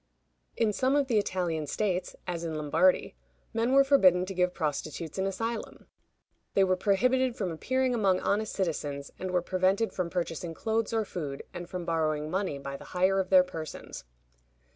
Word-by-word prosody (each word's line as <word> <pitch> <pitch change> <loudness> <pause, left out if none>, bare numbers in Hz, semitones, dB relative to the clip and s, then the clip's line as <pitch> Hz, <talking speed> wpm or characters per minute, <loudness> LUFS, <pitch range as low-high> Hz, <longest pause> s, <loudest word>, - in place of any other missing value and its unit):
In 220 -2 +2
some 260 +5 +2
of 285 -1 +3
the 235 -5 +2
Italian 170 -6 -1
states, 185 0 -1
as 175 -2 -3
in 160 -2 -3
Lombardy, 155 - +2 0.4
men 230 +2 +1
were 275 0 +7
forbidden 185 -11 +5
to 195 - -5
give 180 -1 +2
prostitutes 155 +1 -3
an 190 - +1
asylum. 225 +4 -4 0.7
They 195 - +5
were 185 -1 +3
prohibited 250 +6 +2
from 190 -4 -2
appearing 260 +10 0
among 195 -5 +2
honest 210 +1 0
citizens, 145 -6 -3
and 185 - -3
were 180 -1 +1
prevented 190 +4 +1
from 180 -2 -2
purchasing 170 -1 -3
clothes 220 +3 -1
or 225 -1 0
food, 145 -8 -5
and 175 0 -7
from 180 -2 -5
borrowing 155 -2 0
money 190 -6 -1
by 140 0 -6
the - - -12
hire 190 +2 +3
of 185 -1 -1
their 185 -1 +7
persons. 165 -4 -7
185 Hz, 175 wpm, -29 LUFS, 165-215 Hz, 0.7 s, were